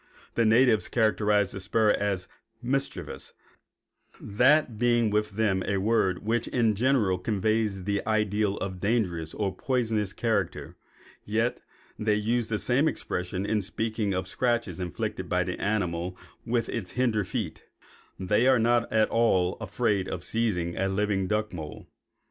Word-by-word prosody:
The 115 - +2
natives 115 0 +4
characterize 105 -3 +2
the 100 - -6
spur 105 +3 +2
as 100 -3 -1 0.3
'mischievous,' 135 +3 -3 0.9
that 125 +2 +2
being 120 -2 +3
with 105 0 0
them 100 -3 +1
a 100 - +1
word 100 -2 +1
which 115 +1 0
in 115 -3 +2
general 110 -5 +2
conveys 105 0 0
the 100 +1 -1
idea 105 -1 +1
of 95 -1 -4
dangerous 90 -8 -1
or 95 -3 -2
poisonous 110 -5 0
character; 115 +1 -2 0.5
yet 115 +3 -1 0.4
they 105 -1 +2
use 115 +2 0
the 110 - -1
same 125 - +2
expression 90 - -3
in 105 0 +1
speaking 110 +1 -2
of 95 - -1
the 90 - -7
scratches 115 -8 0
inflicted 95 +1 -4
by 90 0 +2
the 90 0 -5
animal 90 -4 -1 0.3
with 115 -1 +1
the 115 - -3
hinder 110 +2 0
feet, 95 -4 -5 0.5
and 95 - -6
they 110 +4 +4
are 130 -1 +6
not 120 +1 +2
at 110 -1 +3
all 95 -6 +2
afraid 105 -2 0
of 90 - -5
seizing 90 -7 -1
a 95 - +1
living 95 -1 0
duck 105 0 -1
mole. 80 -4 -8
105 Hz, 150 wpm, -27 LUFS, 95-115 Hz, 0.9 s, are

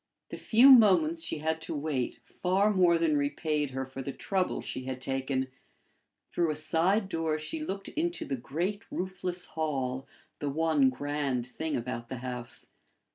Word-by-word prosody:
The - - -6
few 245 +5 +6
moments 270 - +6
she 325 - -3
had 160 +1 -1
to - - -4
wait 140 -4 -2
far 195 +3 +1
more 175 -3 +5
than 160 -3 +2
repaid 150 +1 0
her 135 0 -3
for 135 0 -7
the 140 - -4
trouble 190 +5 -1
she 130 - -5
had 130 -1 -4
taken: 135 0 -2 0.8
through 170 -2 +1
a 155 - -1
side 175 +7 +1
door 165 -4 -1
she 155 - -4
looked 195 -10 -4
into 340 +3 -2
the 135 - -2
great 175 - -3
roofless 180 -1 -2
hall, 135 -4 -2 0.3
the 145 - -2
one 155 -2 +3
grand 140 -2 -2
thing 155 +5 -3
about 120 -1 -5
the 130 - -4
house. 125 -1 -6
155 Hz, 165 wpm, -29 LUFS, 135-185 Hz, 0.8 s, few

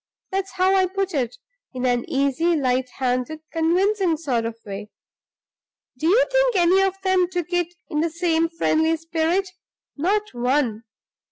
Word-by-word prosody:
That's 385 0 -2
how 375 +1 +2
I 375 -1 +3
put 385 0 -2
it, 245 -4 -1 0.4
in 255 0 -2
an 245 -1 0
easy, 280 +5 +1
light 255 -3 0
handed, 255 +4 -1
convincing 355 +2 +2
sort 255 -8 -1
of 230 0 -3
way. 205 +1 -7 1.1
Do 305 +6 -2
you 450 +8 +5
think - - +3
any 365 +1 +4
of 385 0 0
them 375 -2 +3
took 355 -1 -4
it 350 0 0
in 300 -4 -2
the 330 +2 +1
same 330 0 +1
friendly 325 -1 +1
spirit? 330 +4 -1 0.4
Not 410 +8 0
one! 245 -2 0
330 Hz, 155 wpm, -23 LUFS, 265-375 Hz, 1.1 s, you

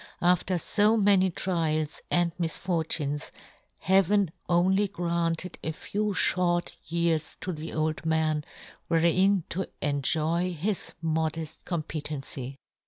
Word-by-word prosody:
After 180 +1 +3
fo'many 205 -1 +4
trials 160 -4 -1
and 175 -1 +3
misfortunes, 160 -3 -1 0.5
Heaven 195 -1 +3 0.2
only 190 +4 +3
granted 170 -2 -1
a 160 - -2
few 210 +5 -2
fhort 175 -2 +2
years 165 -1 0
to 185 - -3
the 155 +1 -6
old 155 0 -1
man, 160 -1 +1 0.4
wherein 180 +3 +3
to 190 +2 -2
enjoy 160 +5 0
his 185 +5 -2
modefl 160 0 -2
competency. 145 -5 -4
170 Hz, 105 wpm, -27 LUFS, 155-185 Hz, 0.5 s, fo'many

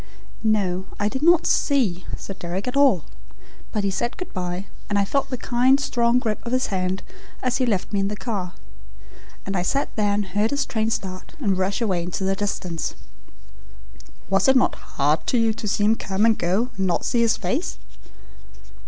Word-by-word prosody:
"No. 195 -4 +1
I 205 - +2
did 265 +5 -3
not 340 +1 +5
SEE 220 - +2
Sir 195 - -7
Deryck 185 +3 -4
at 250 - -2
all. 270 - +5 0.7
But 210 - -1
he 200 - +1
said 235 +5 -2
good 365 - -7
bye, 180 +1 -3 0.2
and 205 - +1
I 200 - +3
felt 275 +7 0
the 255 - -3
kind, 255 +3 +3
strong 240 -3 +2
grip 225 -4 -1
of 235 - -4
his 255 -5 0
hand 185 0 -1 0.4
as 255 -1 +1
he 255 - +1
left 205 -2 -1
me 200 - +2
in 195 - +1
the 210 - -3
car. 205 -6 -4 0.9
And 195 - -3
I 180 - +1
sat 275 +10 -1
there 210 -2 +2
and 205 0 0
heard 205 +4 0
his 280 +2 0
train 220 -1 0
start 185 - -4
and 200 -9 +1
rush 190 +4 -1
away 190 -6 +1
into 175 +2 -3
the 195 0 +1
distance." 185 -4 -3 1.3
"Was 195 +5 +2
it 265 - +6
not 255 - +4 0.2
hard 150 +3 +2
to 250 - +2
you 225 -1 +3
to 215 - -5
let 205 - 0
him 210 +2 +4
come 195 0 0
and 225 -1 +5
go 200 +9 0
and 190 -1 +1
not 175 - +1
to - - -3
see 235 - +2
his 230 -1 +3
face?" - - -2
205 Hz, 205 wpm, -23 LUFS, 190-240 Hz, 1.3 s, it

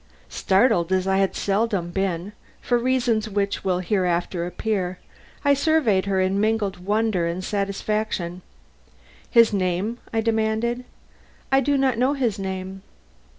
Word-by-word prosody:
Startled 190 - +2
as 185 0 +2
I 190 0 +2
had 195 -1 +1
seldom 200 -4 0
been, 190 +1 -2 0.3
for 240 -1 +1
reasons 240 -3 +1
which 200 -1 -1
will 185 -2 +1
hereafter 175 -2 0
appear, 185 0 -2 0.5
I 285 - +6
surveyed 280 - +2
her 195 -1 +1
in 190 +2 +1
mingled 215 -3 0
wonder 205 -2 0
and 175 +2 -3
satisfaction. 200 -2 -2 0.9
"His 230 -3 +5
name?" 190 +4 -1
I 225 - +1
demanded. 225 +2 0 0.7
"I 270 - +5
do 280 +1 +1
not 260 -4 +1
know 260 +3 +3
his 240 -8 -1
name." 190 0 -5
200 Hz, 135 wpm, -23 LUFS, 185-230 Hz, 0.9 s, I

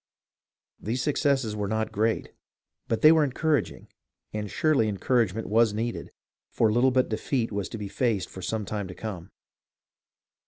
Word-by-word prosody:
These 120 +4 -2
successes 135 -6 +1
were 105 -1 -2
not 110 +1 -1
great, 110 +2 0 0.6
but 115 - -1
they 155 - +9
were 160 -1 +5
encouraging, 145 -1 -1 0.5
and 105 -1 -3
surely 150 -5 +2
encouragement 110 +1 0
was 110 0 +3
needed, 115 +2 -3 0.4
for 110 -2 +2
little 120 +4 +4
but 130 0 +2
defeat 115 +2 -1
was 100 -2 -3
to - - -6
be 105 -2 -5
faced 105 -3 0
for 95 - -10
some 110 +3 -2
time 100 -1 -4
to 90 - -9
come. 95 -5 -6
110 Hz, 155 wpm, -27 LUFS, 105-125 Hz, 0.6 s, they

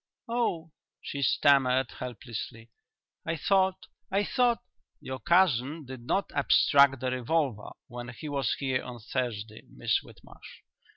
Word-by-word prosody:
"Oh!" 225 -9 -1 0.3
she 140 - -5
stammered 130 -2 +3
helplessly. 115 -2 -7 0.5
"I 165 - -2
thought 190 +2 +2 0.2
I 195 +1 +1
thought 240 +1 +1 0.2
" - - -52
"Your 130 0 -6
cousin 155 -4 +2
did 130 -1 -8
not 200 - 0
abstract 140 -1 +4
the 130 -1 -1
revolver 130 -2 -1 0.2
when 120 0 -7
he 120 +5 -8
was 140 -5 0
here 130 -2 -1
on 125 -1 -8
Thursday, 110 -3 -4
Miss - - 0
Whitmarsh. - - -15
135 Hz, 130 wpm, -29 LUFS, 125-165 Hz, 0.5 s, abstract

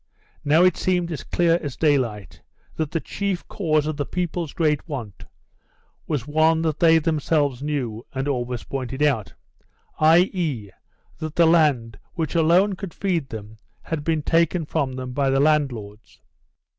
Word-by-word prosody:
Now 155 +4 +4
it 185 -2 +4
seemed 180 -2 0
as 155 - -5
clear 170 -1 +2
as 145 -5 -5
daylight 125 - 0 0.3
that 155 -2 -2
the 165 - -1
chief 195 +1 -3
cause 155 -6 0
of 155 -1 -3
the 145 - -1
people's 175 -3 -3
great 155 0 0
want 120 -9 -6 0.8
was 145 -6 -2
one 160 +2 +2
that 155 -2 -1
they 165 -1 +6
themselves 150 -4 0
knew 130 -7 -3
and 135 +1 -3
always 125 -3 -2
pointed 135 +1 -4
out, 115 -11 0 0.6
i.e., 160 - +2 0.5
that 155 -1 -5
the 170 - +5
land 145 -10 +2 0.2
which 160 -4 -2
alone 175 +5 +4
could 190 -2 -7
feed 170 -8 -1
them 110 0 -8 0.3
had 160 -3 -4
been 160 -1 0
taken 165 +1 +2
from 145 -4 -1
them 130 0 -6
by 140 0 +1
the 135 0 +2
landlords. 125 -9 -1
150 Hz, 155 wpm, -23 LUFS, 130-165 Hz, 0.8 s, they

